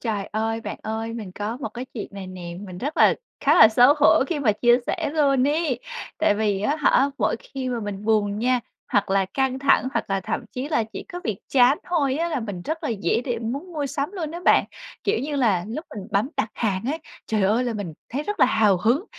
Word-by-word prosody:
Trời 210 Hz, -4 st, -2 dB
ơi! 225 Hz, +1 st, -2 dB
Bạn -, -, -6 dB
ơi, 225 Hz, +1 st, -3 dB
mình 215 Hz, -5 st, -7 dB
có 210 Hz, +4 st, -4 dB
một 255 Hz, -, -4 dB
cái 240 Hz, +4 st, -7 dB
chuyện 215 Hz, -, -4 dB
này 195 Hz, -1 st, -7 dB
nè, 180 Hz, -2 st, -7 dB
mình 185 Hz, -3 st, -8 dB
rất 290 Hz, +9 st, -4 dB
là -, -, +6 dB, 0.3 s
khá -, -, +4 dB
là 220 Hz, -, +9 dB
xấu 245 Hz, +6 st, +6 dB
hổ 290 Hz, -, +6 dB
khi 330 Hz, -1 st, -2 dB
mà 245 Hz, -7 st, +3 dB
chia 240 Hz, +3 st, +4 dB
sẻ -, -, -1 dB
luôn 275 Hz, -3 st, +3 dB
ấy. 295 Hz, -5 st, 0 dB, 0.4 s
Tại 205 Hz, -, +3 dB
vì 205 Hz, -2 st, 0 dB
á 285 Hz, +9 st, +1 dB
hả, 280 Hz, -1 st, +3 dB
mỗi -, -, +1 dB
khi 270 Hz, -, -6 dB
mà 240 Hz, -2 st, -2 dB
mình 205 Hz, -1 st, -5 dB
buồn 210 Hz, -2 st, +1 dB
nha, 250 Hz, +2 st, +2 dB, 0.3 s
hoặc 205 Hz, -1 st, +2 dB
là 195 Hz, 0 st, +3 dB
căng 265 Hz, -1 st, +1 dB
thẳng, 270 Hz, -1 st, +3 dB
hoặc -, -, 0 dB
là 195 Hz, 0 st, +1 dB
thậm -, -, -3 dB
chí 255 Hz, +3 st, -4 dB
là 265 Hz, -8 st, +1 dB
chỉ -, -, -6 dB
có 355 Hz, -, -5 dB
việc 215 Hz, -4 st, -2 dB
chán 260 Hz, +2 st, +5 dB
thôi 285 Hz, -7 st, +1 dB
á 335 Hz, +2 st, 0 dB
là 310 Hz, -6 st, -2 dB
mình 200 Hz, -6 st, -5 dB
rất 320 Hz, -, -4 dB
là -, -, -1 dB
dễ 200 Hz, -2 st, 0 dB
để 240 Hz, -3 st, -2 dB
muốn 275 Hz, +11 st, -5 dB
mua 295 Hz, -3 st, -2 dB
sắm 280 Hz, +2 st, -3 dB
luôn 335 Hz, -6 st, -4 dB
á 340 Hz, +2 st, -6 dB
bạn. -, -, +5 dB, 0.4 s
Kiểu 415 Hz, -, +1 dB
như 290 Hz, +1 st, -3 dB
là, 205 Hz, -9 st, +2 dB
lúc 305 Hz, +9 st, -5 dB
mình 200 Hz, 0 st, -7 dB
bấm 205 Hz, +5 st, +1 dB
đặt 220 Hz, -, -1 dB
hàng 195 Hz, -4 st, -1 dB
á, 320 Hz, -, -3 dB, 0.3 s
trời 215 Hz, -2 st, 0 dB
ơi, 215 Hz, +6 st, +2 dB
là 240 Hz, -, -1 dB
mình 200 Hz, -6 st, -4 dB, 0.2 s
thấy 275 Hz, +5 st, -2 dB
rất 415 Hz, +6 st, -4 dB
là -, -, +7 dB
hào 215 Hz, -5 st, +3 dB
hứng, 235 Hz, -, +1 dB
235 Hz, 245 wpm, -24 LUFS, 205-280 Hz, 0.4 s, là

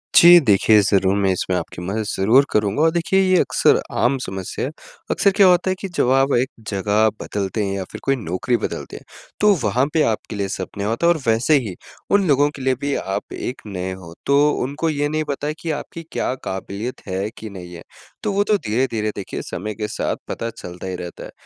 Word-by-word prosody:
जी 175 Hz, 0 st, +10 dB
देखिए, 105 Hz, -, +4 dB
ज़रूर 95 Hz, -1 st, +2 dB
मैं 95 Hz, -1 st, +2 dB
इसमें 90 Hz, 0 st, -1 dB
आपकी 90 Hz, 0 st, -6 dB
मदद 105 Hz, +5 st, -2 dB
ज़रूर 115 Hz, +9 st, +4 dB
करूँगा 105 Hz, +6 st, +1 dB
और 160 Hz, 0 st, +4 dB
देखिए 175 Hz, +3 st, +1 dB
ये 185 Hz, -1 st, +4 dB
अक्सर -, -, +3 dB, 0.2 s
आम 135 Hz, +2 st, +2 dB
समस्या 95 Hz, +5 st, -4 dB
है। 145 Hz, -, -4 dB, 0.4 s
अक्सर 200 Hz, -, +3 dB
क्या 195 Hz, -, +6 dB
होता 180 Hz, +1 st, +4 dB
है 185 Hz, -, +1 dB
कि 195 Hz, -, -3 dB
जब 125 Hz, -, +3 dB
आप 135 Hz, +1 st, +3 dB
एक 130 Hz, +2 st, +1 dB, 0.2 s
जगह 105 Hz, +2 st, +2 dB
बदलते 100 Hz, +1 st, -2 dB
हैं 100 Hz, 0 st, -2 dB
या 95 Hz, -, -3 dB
फिर -, -, -8 dB
कोई 135 Hz, 0 st, +2 dB
नौकरी 115 Hz, +3 st, -1 dB
बदलते -, -, -5 dB
हैं -, -, -13 dB, 0.4 s
तो 210 Hz, -1 st, +5 dB
वहाँ 120 Hz, +6 st, +2 dB
पे 160 Hz, -, +3 dB
आपके 110 Hz, -1 st, -2 dB
लिए 100 Hz, -1 st, -1 dB
सब 95 Hz, -, -4 dB
नया 100 Hz, +1 st, -2 dB
होता 120 Hz, +10 st, +1 dB
है 175 Hz, -, +6 dB
और 160 Hz, -, -5 dB
वैसे 115 Hz, +7 st, +4 dB
ही 90 Hz, -, -6 dB, 0.4 s
उन 200 Hz, -3 st, +4 dB
लोगों 145 Hz, 0 st, +4 dB
के 135 Hz, -, -8 dB
लिए 130 Hz, 0 st, +1 dB
भी 140 Hz, 0 st, -1 dB
आप 95 Hz, -, -4 dB
एक 125 Hz, -, -5 dB
नए 95 Hz, -1 st, -4 dB
हो 85 Hz, -3 st, -11 dB
तो 140 Hz, 0 st, +3 dB, 0.3 s
उनको 145 Hz, +5 st, -2 dB
ये 145 Hz, -1 st, 0 dB
नहीं 155 Hz, 0 st, -1 dB
पता 140 Hz, +1 st, -2 dB
है 150 Hz, -, -1 dB
कि 165 Hz, -, -2 dB
आपकी 155 Hz, +3 st, -6 dB
क्या -, -, -1 dB
काबिलियत 100 Hz, +5 st, -5 dB
है 95 Hz, +3 st, -2 dB
कि 110 Hz, -, -7 dB
नहीं 90 Hz, -2 st, -9 dB
है। 85 Hz, -, -10 dB, 0.4 s
तो 210 Hz, -, 0 dB
वो 200 Hz, +1 st, +2 dB
तो 210 Hz, 0 st, +2 dB
धीरे-धीरे 110 Hz, -, -1 dB
देखिए 100 Hz, -, -5 dB
समय 105 Hz, +3 st, -5 dB
के 105 Hz, 0 st, -3 dB
साथ -, -, -2 dB
पता 115 Hz, -, -4 dB
चलता 90 Hz, -4 st, -9 dB
ही 95 Hz, -, -3 dB
रहता 90 Hz, -1 st, -7 dB
है। -, -, -9 dB
115 Hz, 225 wpm, -21 LUFS, 100-145 Hz, 0.4 s, जी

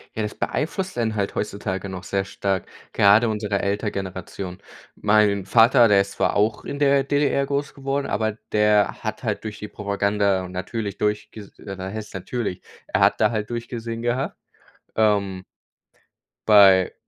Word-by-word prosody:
Ja, 110 Hz, -, -2 dB
das 105 Hz, 0 st, -3 dB
beeinflusst 175 Hz, +5 st, -2 dB
einen 110 Hz, -2 st, 0 dB
halt 100 Hz, -1 st, -1 dB
heutzutage 100 Hz, -2 st, -3 dB
noch 95 Hz, 0 st, -7 dB
sehr 100 Hz, -1 st, -1 dB
stark, 100 Hz, -1 st, -2 dB, 0.3 s
gerade 105 Hz, +3 st, +5 dB
unsere 105 Hz, -2 st, -1 dB
Eltern-Generation. 95 Hz, -2 st, -4 dB, 0.4 s
Mein 105 Hz, -2 st, +3 dB
Vater, 120 Hz, +3 st, +6 dB
der 100 Hz, -2 st, +5 dB
ist 100 Hz, -, -4 dB
zwar -, -, 0 dB
auch 105 Hz, +1 st, +1 dB
in 140 Hz, -, -5 dB
der 140 Hz, -1 st, +3 dB
DDR 140 Hz, -1 st, +1 dB
groß 140 Hz, +1 st, -2 dB
geworden, 140 Hz, 0 st, -2 dB
aber 110 Hz, 0 st, -1 dB, 0.2 s
der 105 Hz, -1 st, +2 dB
hat -, -, -5 dB
halt -, -, -2 dB
durch 110 Hz, -1 st, -6 dB
die 105 Hz, -, -7 dB
Propaganda 100 Hz, -2 st, 0 dB
und 90 Hz, -, -9 dB
natürlich 100 Hz, +2 st, -4 dB
durchges 105 Hz, 0 st, -3 dB
äh, 100 Hz, -2 st, -8 dB
was 95 Hz, +2 st, -5 dB
heißt 110 Hz, -1 st, -7 dB
natürlich, 95 Hz, 0 st, -4 dB, 0.3 s
er -, -, 0 dB
hat -, -, +4 dB
da -, -, +4 dB
halt 105 Hz, -1 st, -3 dB
durchgesehen 115 Hz, -1 st, -5 dB
gehabt, 125 Hz, +3 st, -1 dB, 0.6 s
ähm 100 Hz, -4 st, +1 dB, 1.0 s
bei 95 Hz, -3 st, +6 dB
105 Hz, 160 wpm, -23 LUFS, 100-115 Hz, 1.0 s, Vater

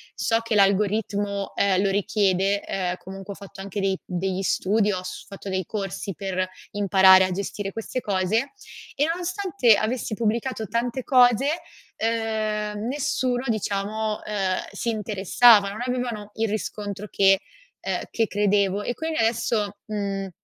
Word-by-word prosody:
so 225 Hz, 0 st, +1 dB
che 230 Hz, -1 st, -2 dB
l'algoritmo, 200 Hz, 0 st, +1 dB
ehm, 195 Hz, -1 st, +2 dB
lo 195 Hz, -, +2 dB
richiede, 200 Hz, 0 st, +1 dB
ehm, 180 Hz, -2 st, -2 dB
comunque 195 Hz, +1 st, -8 dB
ho -, -, -13 dB
fatto 200 Hz, -1 st, -12 dB
anche 195 Hz, +1 st, -5 dB
dei 195 Hz, -1 st, +1 dB
degli 185 Hz, +1 st, -2 dB
studi, 205 Hz, +2 st, +1 dB
ho 185 Hz, 0 st, -4 dB
s 185 Hz, -, -7 dB
fatto 195 Hz, 0 st, -8 dB
dei 190 Hz, -2 st, -1 dB
corsi 195 Hz, -1 st, -4 dB
per 185 Hz, +1 st, -2 dB, 0.2 s
imparare 190 Hz, -2 st, +6 dB
a 185 Hz, -, -3 dB
gestire 195 Hz, +1 st, -4 dB
queste 225 Hz, +3 st, -4 dB
cose, 210 Hz, -, 0 dB, 0.4 s
e 290 Hz, -, +2 dB
nonostante 340 Hz, -, +2 dB
avessi 220 Hz, +2 st, -2 dB
pubblicato 230 Hz, +1 st, -1 dB
tante 240 Hz, +3 st, -2 dB
cose, 250 Hz, -1 st, +5 dB, 0.5 s
uhm, 215 Hz, -1 st, -1 dB
nessuno 260 Hz, -3 st, -1 dB
diciamo, 215 Hz, 0 st, -1 dB
uhm, 195 Hz, -3 st, -1 dB
si 235 Hz, -, -3 dB
interessava, 210 Hz, 0 st, +4 dB
non 215 Hz, +4 st, -6 dB
avevano 240 Hz, -5 st, -3 dB
il 225 Hz, -1 st, 0 dB
riscontro 210 Hz, -1 st, -4 dB
che 195 Hz, -1 st, +4 dB, 0.5 s
ehm, -, -, -1 dB
che 225 Hz, -2 st, +1 dB
credevo 205 Hz, -1 st, +1 dB
e 245 Hz, -, -2 dB
quindi 320 Hz, +2 st, -3 dB
adesso, 225 Hz, -2 st, 0 dB
mhmm, 200 Hz, -2 st, -3 dB
205 Hz, 145 wpm, -24 LUFS, 195-230 Hz, 0.5 s, imparare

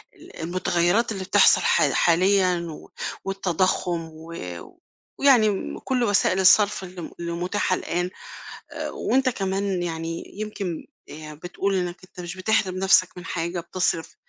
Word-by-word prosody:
ال -, -, -15 dB
المتغيّرات 175 Hz, +5 st, +1 dB
اللي 195 Hz, -3 st, -4 dB
بتحصَل -, -, +5 dB
حال -, -, +3 dB
حاليًا 185 Hz, +1 st, +3 dB
و 155 Hz, -, -10 dB, 0.4 s
والتضخُّم، 180 Hz, -3 st, -1 dB
و 160 Hz, +1 st, -11 dB, 0.9 s
ويعني، 250 Hz, -6 st, +5 dB
م 195 Hz, -, -4 dB
كلّ 255 Hz, -2 st, -1 dB
وسائل 200 Hz, -3 st, +2 dB
الصّرف 200 Hz, +2 st, +5 dB
اللي 180 Hz, -1 st, -8 dB
م -, -, -7 dB
اللي 170 Hz, 0 st, -4 dB
متاحة 180 Hz, +4 st, 0 dB
الآن، 175 Hz, +2 st, -2 dB, 0.6 s
آآ، -, -, -4 dB
وأنت 265 Hz, 0 st, +1 dB
كمان، 195 Hz, -3 st, -2 dB
يعني، 165 Hz, 0 st, -4 dB, 0.2 s
يمكن، 200 Hz, -6 st, -4 dB, 0.2 s
آآ، 155 Hz, 0 st, -9 dB
بتقول 175 Hz, +5 st, -3 dB
إنك 180 Hz, -1 st, -2 dB
أنت 185 Hz, -, -15 dB
مش 175 Hz, +1 st, -6 dB
بتحرِم 185 Hz, -1 st, +1 dB
نَفسك 185 Hz, -1 st, +3 dB
من 180 Hz, -, -9 dB
حاجة 170 Hz, 0 st, -3 dB
بتصرِف، 170 Hz, -1 st, -2 dB
185 Hz, 145 wpm, -24 LUFS, 170-195 Hz, 0.9 s, بتحصَل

